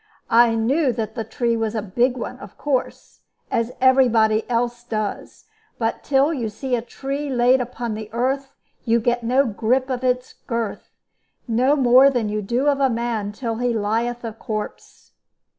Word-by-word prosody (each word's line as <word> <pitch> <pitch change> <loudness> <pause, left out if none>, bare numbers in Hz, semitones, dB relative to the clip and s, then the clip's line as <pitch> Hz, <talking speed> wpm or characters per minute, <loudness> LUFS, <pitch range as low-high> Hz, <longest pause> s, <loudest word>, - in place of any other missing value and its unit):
I 230 0 +5
knew 260 +6 +2
that 220 -2 -4
the 225 - -3
tree 235 +2 -1
was 225 -1 -2
a 220 - 0
big 245 +6 +1
one, 235 - -6
of 200 - -12
course, 275 -4 -3 0.3
as 230 +1 0
every 260 0 +5
body 220 -1 +2
else 240 0 -1
does; 215 -4 -4 0.3
but 225 -1 -1
till 280 +3 +2
you 240 -7 -2
see 250 +4 -2
a 235 - -2
tree 275 +4 -5
laid 250 0 +3
upon 240 -2 -4 0.2
earth 270 +4 -2 0.3
you 235 -1 +2
get 240 +1 0
no 255 +4 +2
grip 250 +4 0
of 250 -1 -2
his 250 0 -1
girth, 230 -4 -3 0.6
no 250 +5 +3
more 260 0 +6
than 240 -6 -1
you 210 0 -2
do 240 +7 -1
of 280 -1 +3
a 270 -1 +3
man 230 -3 -2
till 225 +1 -4
he 245 0 0
lieth 230 +3 -1
a 225 -2 -4
corpse. 215 -1 -7
240 Hz, 175 wpm, -22 LUFS, 225-260 Hz, 0.6 s, more